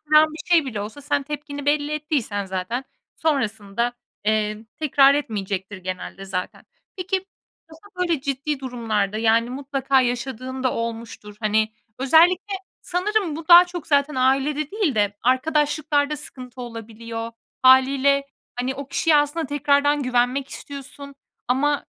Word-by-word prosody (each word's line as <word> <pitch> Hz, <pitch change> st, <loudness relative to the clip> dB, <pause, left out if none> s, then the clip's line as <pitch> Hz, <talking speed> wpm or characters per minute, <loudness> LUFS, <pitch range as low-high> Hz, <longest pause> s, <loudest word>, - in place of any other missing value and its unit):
bir 310 Hz, +1 st, +5 dB
şey 330 Hz, -4 st, +5 dB
bile 220 Hz, -6 st, -4 dB
olsa 215 Hz, +8 st, -7 dB
sen 285 Hz, 0 st, 0 dB
tepkini 290 Hz, -1 st, -6 dB
belli 290 Hz, 0 st, +1 dB
ettiysen 280 Hz, -10 st, -2 dB
zaten, 190 Hz, +7 st, -3 dB, 0.3 s
sonrasında, 235 Hz, -6 st, -1 dB, 0.3 s
eee, 215 Hz, 0 st, 0 dB
tekrar 280 Hz, -2 st, +5 dB
etmeyecektir, 205 Hz, -8 st, -3 dB
genelde, 185 Hz, +1 st, -6 dB
zaten. 185 Hz, -1 st, -5 dB, 0.3 s
Peki, 370 Hz, +1 st, -2 dB, 0.4 s
aslında 360 Hz, +5 st, -17 dB
böyle 320 Hz, -6 st, 0 dB
ciddi 280 Hz, +1 st, -2 dB
durumlarda, 220 Hz, -5 st, -2 dB
yani, 230 Hz, +1 st, +3 dB
mutlaka 270 Hz, 0 st, +1 dB
yaşadığın 255 Hz, +1 st, -3 dB
da 255 Hz, -, +1 dB
olmuştur. 230 Hz, -2 st, -5 dB
Hani, 215 Hz, 0 st, +2 dB, 0.3 s
özellikle 340 Hz, +9 st, +4 dB, 0.3 s
sanırım 365 Hz, -2 st, -1 dB
bu 320 Hz, 0 st, -8 dB
daha 350 Hz, +1 st, +10 dB
çok 350 Hz, -3 st, -7 dB
zaten 285 Hz, -1 st, +2 dB
ailede 275 Hz, +4 st, +1 dB
değil 395 Hz, -, 0 dB
de 205 Hz, -1 st, +1 dB
arkadaşlıklarda 295 Hz, +2 st, +1 dB
sıkıntı 255 Hz, -3 st, -10 dB
olabiliyor. 230 Hz, 0 st, -7 dB, 0.3 s
Hâliyle, 270 Hz, +2 st, +5 dB, 0.3 s
hani, 250 Hz, +2 st, -2 dB
o 275 Hz, 0 st, -7 dB
kişiye 320 Hz, +2 st, +2 dB
aslında 295 Hz, +2 st, +1 dB
tekrardan 285 Hz, +1 st, +2 dB
güvenmek 255 Hz, +2 st, +1 dB
istiyorsun 280 Hz, 0 st, -9 dB, 0.3 s
ama 285 Hz, +3 st, +1 dB
270 Hz, 130 wpm, -23 LUFS, 230-295 Hz, 0.4 s, daha